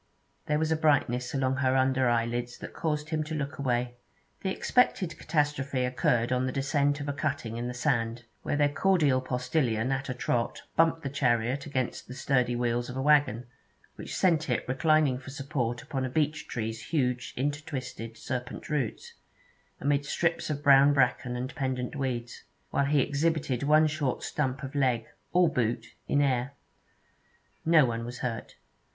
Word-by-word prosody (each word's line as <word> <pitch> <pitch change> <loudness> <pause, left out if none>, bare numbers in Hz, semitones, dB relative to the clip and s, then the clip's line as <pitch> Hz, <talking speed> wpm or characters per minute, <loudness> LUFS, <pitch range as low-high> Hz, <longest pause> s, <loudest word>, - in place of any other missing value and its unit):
There 150 - +2
was 160 +1 0
a - - +4
brightness 140 -5 +2
along 130 -1 +1
her 130 -1 +2
under 130 -1 +3
eyelids 120 +1 -1
that - - -9
caused 150 -2 -2
him 155 -1 0
to 155 +1 -4
look 140 -1 -4
away. 125 -2 -1 0.4
The 190 - -1
expected 190 -5 +1
catastrophe 140 -4 0
occurred 125 -1 +1
on 130 0 +1
the - - -1
descent 145 +1 +1
of 145 - -5
a 145 - -1
cutting 140 -6 -2
in 120 +1 -3
the 125 - -5
sand, 120 -3 0 0.2
where - - -1
their 145 0 +2
cordial 155 -7 +3
postillion 125 -2 0
at 135 +1 -2
a 130 - -2
trot 120 -1 -1
bumped 165 0 +3
the 140 - -2
chariot 125 0 +1
against 130 -4 -3
the 125 - -8
sturdy 125 -2 +1
wheels 120 0 -1
of 125 - -5
a - - -1
waggon, 145 -5 +3 0.5
which - - -7
sent 165 -5 +2
it 120 - -1
reclining 135 +1 +2
for 135 - -10
support 135 -4 -3
upon 135 -2 -3
a 130 - -1
beech 150 +2 -1
tree's 115 -1 -4
huge 125 -5 -1
intertwisted 130 -5 -4
serpent 125 +2 -5
roots, 290 - -2 0.7
amid 140 0 +1
strips 165 +3 -1
of 145 -1 -3
brown 140 0 +7
bracken 125 -2 +1
and 125 +2 -4
pendant 130 -1 -2
weeds, 125 -4 -3 0.3
while 140 - +2
he 145 0 +3
exhibited 145 -3 0
one 155 +2 +5
short 150 -4 -1
stump 135 -1 -2
of 135 - -6
leg, 125 -5 +1 0.3
all 180 0 +5
boot, 120 -3 -1
in 145 - +2
air. 130 0 0 1.1
No 160 -3 +6
one 115 -1 -2
was 120 +1 -6
hurt. 115 -3 -4
135 Hz, 170 wpm, -28 LUFS, 125-150 Hz, 1.1 s, brown